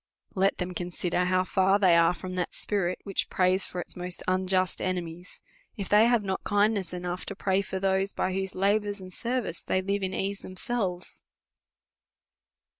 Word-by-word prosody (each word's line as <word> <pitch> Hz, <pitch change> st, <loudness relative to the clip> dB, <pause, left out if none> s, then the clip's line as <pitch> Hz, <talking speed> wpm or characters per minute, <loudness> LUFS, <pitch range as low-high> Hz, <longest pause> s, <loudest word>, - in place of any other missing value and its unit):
Let 195 Hz, 0 st, +2 dB
them 180 Hz, 0 st, -3 dB
consider 180 Hz, 0 st, -1 dB
how 185 Hz, 0 st, +2 dB
far 190 Hz, +1 st, +3 dB
they 185 Hz, -4 st, +5 dB
are 170 Hz, +1 st, +4 dB
from 185 Hz, 0 st, -6 dB
that 180 Hz, -2 st, -2 dB
spirit, 185 Hz, -4 st, 0 dB
which 195 Hz, -2 st, -1 dB
prays 185 Hz, +1 st, +2 dB
for 180 Hz, -, -5 dB
its -, -, -5 dB
most 180 Hz, 0 st, -4 dB
un 185 Hz, 0 st, +1 dB
just 185 Hz, -1 st, +1 dB
enemies, 180 Hz, -1 st, -4 dB, 0.4 s
if 200 Hz, -3 st, -4 dB
they 210 Hz, +2 st, +6 dB
have 240 Hz, -3 st, +3 dB
not 190 Hz, -1 st, -2 dB
kindness 205 Hz, -2 st, +1 dB
enoui^h 180 Hz, 0 st, -4 dB
to 195 Hz, -, -5 dB
pray 190 Hz, 0 st, +1 dB
for 190 Hz, -1 st, -4 dB
those 195 Hz, +1 st, +1 dB
by 185 Hz, -, -1 dB
whose 190 Hz, 0 st, -3 dB
labour 205 Hz, +2 st, +2 dB
and 185 Hz, -1 st, -10 dB
service 235 Hz, -7 st, -1 dB
they 185 Hz, -, 0 dB
live 200 Hz, +2 st, -1 dB
in 190 Hz, 0 st, -2 dB
ease 200 Hz, +1 st, -2 dB
themselves. 185 Hz, -2 st, -3 dB
185 Hz, 180 wpm, -28 LUFS, 180-200 Hz, 0.4 s, they